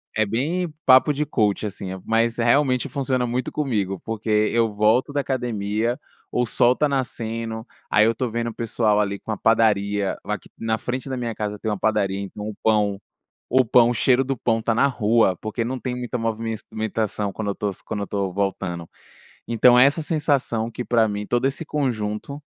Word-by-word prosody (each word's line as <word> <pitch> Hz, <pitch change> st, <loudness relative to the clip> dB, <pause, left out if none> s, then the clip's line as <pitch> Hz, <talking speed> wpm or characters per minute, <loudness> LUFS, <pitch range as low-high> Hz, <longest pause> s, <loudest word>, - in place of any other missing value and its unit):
É 110 Hz, 0 st, +2 dB
bem 155 Hz, -, -1 dB
papo 130 Hz, +3 st, +6 dB
de 150 Hz, +2 st, -1 dB
coach, 110 Hz, -7 st, +1 dB
assim, 95 Hz, -1 st, -7 dB, 0.2 s
mas 115 Hz, +1 st, +1 dB
realmente 125 Hz, +2 st, +2 dB
funciona 130 Hz, -3 st, -1 dB
muito 125 Hz, +2 st, -2 dB
comigo, 105 Hz, -10 st, -1 dB
porque 110 Hz, 0 st, -5 dB, 0.2 s
eu 115 Hz, -2 st, +1 dB
volto 110 Hz, +7 st, +2 dB
da 145 Hz, -, +1 dB
academia, 120 Hz, -2 st, -1 dB, 0.3 s
o 125 Hz, -, +1 dB
sol 120 Hz, +2 st, +3 dB
tá 150 Hz, -, +2 dB
nascendo, 115 Hz, -4 st, -3 dB, 0.3 s
aí 105 Hz, 0 st, +5 dB
eu 115 Hz, +1 st, +2 dB
tô 125 Hz, -, -1 dB
vendo 115 Hz, +1 st, -2 dB
o -, -, -8 dB
pessoal 110 Hz, -2 st, +1 dB
ali 100 Hz, -1 st, -1 dB
com -, -, -6 dB
a 105 Hz, -, -2 dB
padaria, 105 Hz, -3 st, +2 dB
aqui -, -, -5 dB
na 110 Hz, -1 st, -1 dB
frente 125 Hz, +4 st, -4 dB
da 130 Hz, -, -2 dB
minha 120 Hz, -2 st, -3 dB
casa 105 Hz, -1 st, -4 dB
tem 110 Hz, -, -3 dB
uma 105 Hz, -, -1 dB
padaria, 100 Hz, -3 st, +1 dB
então 100 Hz, +1 st, -6 dB
o 105 Hz, -, -7 dB
pão, 105 Hz, -2 st, +2 dB, 0.5 s
o 130 Hz, 0 st, +4 dB
pão 120 Hz, 0 st, +5 dB
o 120 Hz, -, 0 dB
cheiro 125 Hz, +2 st, +3 dB
do 135 Hz, 0 st, -2 dB
pão 115 Hz, -1 st, 0 dB
tá 115 Hz, 0 st, 0 dB
na 125 Hz, +5 st, +4 dB
rua, 115 Hz, -6 st, +2 dB
porque 110 Hz, +2 st, -3 dB
não 130 Hz, +2 st, -3 dB
tem 125 Hz, -1 st, -3 dB
muita 125 Hz, 0 st, -4 dB
movimença 115 Hz, -1 st, -3 dB
mentação 110 Hz, -2 st, -2 dB
quando 110 Hz, 0 st, -4 dB
eu -, -, -10 dB
tô 105 Hz, 0 st, -2 dB, 0.2 s
quando 105 Hz, -, -3 dB
eu -, -, -1 dB
estou 100 Hz, -1 st, -2 dB
voltando. 95 Hz, -3 st, -2 dB, 0.6 s
Então 120 Hz, +1 st, +5 dB
é 125 Hz, -, +8 dB
essa 145 Hz, +3 st, +1 dB
sensação 140 Hz, -7 st, 0 dB
que 125 Hz, -, -5 dB
pra 115 Hz, -2 st, +3 dB
mim 105 Hz, 0 st, -4 dB
todo 120 Hz, +4 st, +1 dB
esse 140 Hz, +5 st, -2 dB
conjunto, 130 Hz, -2 st, -3 dB
115 Hz, 195 wpm, -23 LUFS, 105-125 Hz, 0.6 s, é